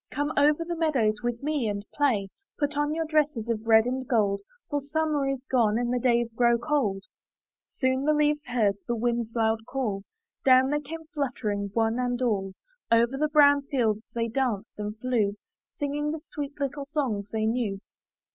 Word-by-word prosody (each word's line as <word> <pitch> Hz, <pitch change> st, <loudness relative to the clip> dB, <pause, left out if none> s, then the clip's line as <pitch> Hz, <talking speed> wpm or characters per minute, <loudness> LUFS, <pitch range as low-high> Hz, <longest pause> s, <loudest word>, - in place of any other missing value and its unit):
''Come 290 Hz, +1 st, -2 dB
over 295 Hz, +3 st, +3 dB
the 345 Hz, 0 st, -3 dB
meadows 255 Hz, -10 st, +1 dB
with 240 Hz, +1 st, -3 dB
me 295 Hz, -5 st, 0 dB
and 200 Hz, 0 st, -4 dB
play; 235 Hz, -10 st, +1 dB, 0.3 s
Put 290 Hz, 0 st, -1 dB
on 295 Hz, +1 st, 0 dB
your 325 Hz, 0 st, -1 dB
dresses 300 Hz, -7 st, 0 dB
of 225 Hz, -1 st, -2 dB
red 220 Hz, 0 st, +6 dB
and 255 Hz, +1 st, -2 dB
gold. 205 Hz, -5 st, +1 dB, 0.3 s
For 290 Hz, 0 st, 0 dB
summer 295 Hz, 0 st, 0 dB
is 270 Hz, -1 st, -2 dB
gone 225 Hz, -4 st, +2 dB
and 240 Hz, 0 st, 0 dB
the 250 Hz, -, +1 dB
days 235 Hz, -2 st, +1 dB
grow 235 Hz, 0 st, +3 dB
cold." 235 Hz, -8 st, 0 dB, 0.6 s
Soon 260 Hz, -1 st, 0 dB
as 275 Hz, -, -3 dB
the 305 Hz, -, +5 dB
leaves 295 Hz, 0 st, +1 dB
heard 220 Hz, -5 st, +1 dB
the 240 Hz, -, 0 dB
wind's 235 Hz, 0 st, -1 dB
loud 225 Hz, -1 st, +2 dB
call, 225 Hz, -7 st, -2 dB, 0.4 s
Down 260 Hz, +1 st, +5 dB
they 295 Hz, -, +1 dB
came 320 Hz, +3 st, -8 dB
fluttering, 220 Hz, -9 st, -2 dB
one 225 Hz, +1 st, +1 dB
and 245 Hz, -1 st, -1 dB
all; 200 Hz, -6 st, 0 dB, 0.4 s
Over 235 Hz, +3 st, +4 dB
the 305 Hz, +2 st, 0 dB
brown 285 Hz, -1 st, +6 dB
fields 225 Hz, -7 st, +1 dB
they 230 Hz, 0 st, 0 dB
danced 230 Hz, -4 st, -1 dB
and 210 Hz, +1 st, -4 dB
flew, 220 Hz, -4 st, 0 dB, 0.4 s
Singing 295 Hz, 0 st, -2 dB
the 315 Hz, +1 st, -3 dB
sweet 290 Hz, 0 st, -6 dB
little 280 Hz, 0 st, -3 dB
songs 250 Hz, -10 st, -2 dB
they 220 Hz, -1 st, -1 dB
knew. 220 Hz, -4 st, -1 dB
250 Hz, 185 wpm, -27 LUFS, 225-290 Hz, 0.6 s, red